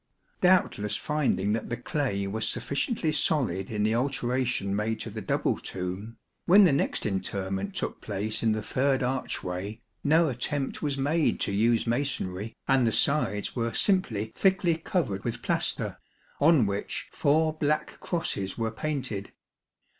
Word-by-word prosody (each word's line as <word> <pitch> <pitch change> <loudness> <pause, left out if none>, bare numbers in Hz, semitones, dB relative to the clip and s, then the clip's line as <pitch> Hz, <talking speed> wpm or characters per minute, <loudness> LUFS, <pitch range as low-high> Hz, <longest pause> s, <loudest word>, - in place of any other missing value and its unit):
Doubtless 180 - +3
finding 135 -10 0
that 115 - -3
the 120 - -2
clay 125 -10 -1
was 110 +3 -1
sufficiently 140 - -1
solid 125 - 0
in 105 -2 -1
the 110 +1 +2
alteration 125 -4 0
made 110 +1 -1
to 115 - -5
the 110 +1 -5
double - - 0
tomb, 95 +5 -5 0.3
when 200 +4 +8
the 180 - +6
next 140 - 0
interment 95 0 -2
took - - -3
place 105 +2 -3
in 110 -2 +3
the 110 -1 -3
third 135 +2 +1
archway, 105 -5 -3 0.2
no 160 +3 +4
attempt 135 +2 -2
was 145 -3 -1
made 150 +4 +1
to - - 0
use 115 +3 +2
masonry, 115 -5 -2
and 135 -3 +4
the - - +2
sides 105 -7 +2
were 115 -2 -1
simply 115 - +1
thickly 190 -3 +3
covered 155 - -2
with - - -4
plaster, - - 0 0.4
on 150 -5 +5
which 100 0 -3
four 155 +2 +2
black 155 -1 -1
crosses 100 - -2
were 115 -1 -1
painted. 125 -6 -3
120 Hz, 145 wpm, -28 LUFS, 105-145 Hz, 0.4 s, when